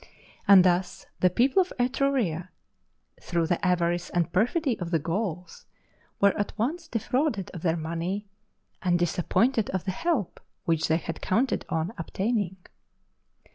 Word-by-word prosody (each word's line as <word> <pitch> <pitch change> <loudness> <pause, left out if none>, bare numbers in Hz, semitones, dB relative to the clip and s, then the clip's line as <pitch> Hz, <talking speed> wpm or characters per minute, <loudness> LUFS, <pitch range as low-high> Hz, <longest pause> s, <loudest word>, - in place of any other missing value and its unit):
And 195 -2 +9
thus 180 0 +1
the 180 - +4
people 260 - +3
of 365 - -3
Etruria, 245 - 0 0.7
through 170 -2 0
the 175 +4 -1
avarice 175 -1 +1
and 175 -1 -1
perfidy 245 - +1
of 175 -2 -4
the 170 - +2
Gauls, 180 +2 -4 0.5
were 200 0 +4
at 205 - -3
once 310 +10 -2
defrauded 230 - -1
of 175 - -8
their 165 -1 +1
money 170 +6 -3 0.5
and 175 -1 +2
disappointed 205 +7 +1
of 190 -2 -2
the 190 - 0
help 305 - -1 0.3
which 160 -2 +1
they 160 - +3
had 165 -1 -6
counted 245 +8 0
on 165 +6 -1
obtaining. 195 +2 -1
185 Hz, 140 wpm, -27 LUFS, 170-235 Hz, 0.7 s, And